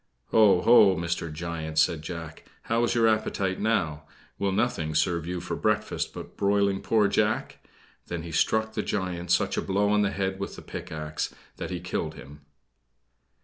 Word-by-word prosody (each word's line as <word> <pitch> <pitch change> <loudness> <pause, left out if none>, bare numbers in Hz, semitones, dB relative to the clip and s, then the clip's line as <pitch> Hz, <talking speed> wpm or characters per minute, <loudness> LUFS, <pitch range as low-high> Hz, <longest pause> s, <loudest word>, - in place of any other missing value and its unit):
"Oh, 105 -5 +6
ho, 105 -4 +7
Mr. 85 -1 -2
Giant!" 80 -1 -5
said 80 0 +3
Jack. 80 -1 -7 0.2
"How 115 +1 +1
is 120 - -1
your 115 -1 +4
appetite 100 -3 0
now! 85 -9 0 0.3
Will 100 -1 +1
nothing 85 -7 0
serve 85 +1 +1
you 90 0 -3
for 90 - -4
breakfast 105 0 -1
but - - -9
broiling 100 -1 +2
poor 110 -2 +3
Jack?" - - 0 0.5
Then 85 -2 -4
he 85 - -7
struck 110 +7 +1
the - - -1
giant 90 -3 -3
such 90 - +2
a - - +1
blow 100 +2 +1
on 105 0 +3
the 100 - +2
head 95 -1 -2
with 100 - -5
a - - -10
pickaxe 75 0 -5 0.2
that - - -5
he - - -3
killed - - -3
him. 70 +2 -12
95 Hz, 175 wpm, -27 LUFS, 80-105 Hz, 0.5 s, ho